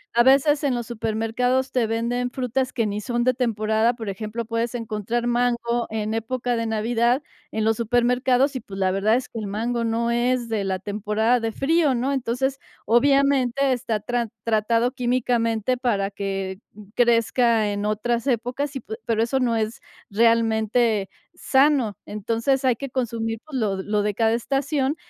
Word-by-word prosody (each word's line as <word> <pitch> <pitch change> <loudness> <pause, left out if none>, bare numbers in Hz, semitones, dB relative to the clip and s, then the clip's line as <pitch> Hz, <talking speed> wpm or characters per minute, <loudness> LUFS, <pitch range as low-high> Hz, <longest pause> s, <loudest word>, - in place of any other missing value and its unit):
a 235 - +6
veces 280 +3 +4
en 275 -3 +1
los 240 -1 -3
supermercados 235 +3 -1
te 240 -3 +1
venden 240 +2 -1
frutas 255 0 -2
que 230 -3 0
ni 210 0 -2
son 240 +1 -1
de 255 - +3
temporada, 225 -1 +1
por 225 -4 -6
ejemplo, 215 +4 -4
puedes 230 +1 -2
encontrar 230 +1 -2
mango 240 -1 0
en 215 0 -2
época 240 +2 -2
de 230 0 -1
Navidad, 235 +4 +1 0.3
en 220 - -1
los 225 0 +2
supermercados 250 +3 +2
y, - - -1
pues, 195 -3 -9
la 185 -1 +2
verdad 205 +4 +2
es 255 - -2
que 225 - -7
el 210 - -4
mango 230 +4 -2
no 230 +1 0
es 240 0 0
de 210 -3 -1
la 190 -1 -1
temporada 210 +4 0
de 225 -1 -2
frío, 290 +2 +2
¿no? 260 +4 0
Entonces, 265 +1 -1 0.3
obviamente, 275 +1 +3
está 230 -4 -2
tra 240 0 -2
tratado 230 +2 +1
químicamente 245 -1 0
para 205 -6 0
que 195 -1 -4 0.4
crezca 235 -2 +3
en 205 0 -3
otras 235 +4 -1
épocas 255 +4 -1
y 265 - -4
pue 220 - -7
pero 225 -1 +2
eso 265 +3 0
no 240 -3 +1
es 220 +1 -2 0.3
realmente 225 -1 +2 0.2
sano. 270 - +2
Entonces, 230 +6 -1
hay 255 -2 +3
que 275 +2 -7
consumir, 225 -3 -2
pues, 290 -4 -5
lo 200 -3 0
lo 210 +1 0
de 210 0 0
cada 225 +2 +2
estación 275 +3 -1
235 Hz, 170 wpm, -23 LUFS, 220-250 Hz, 0.4 s, a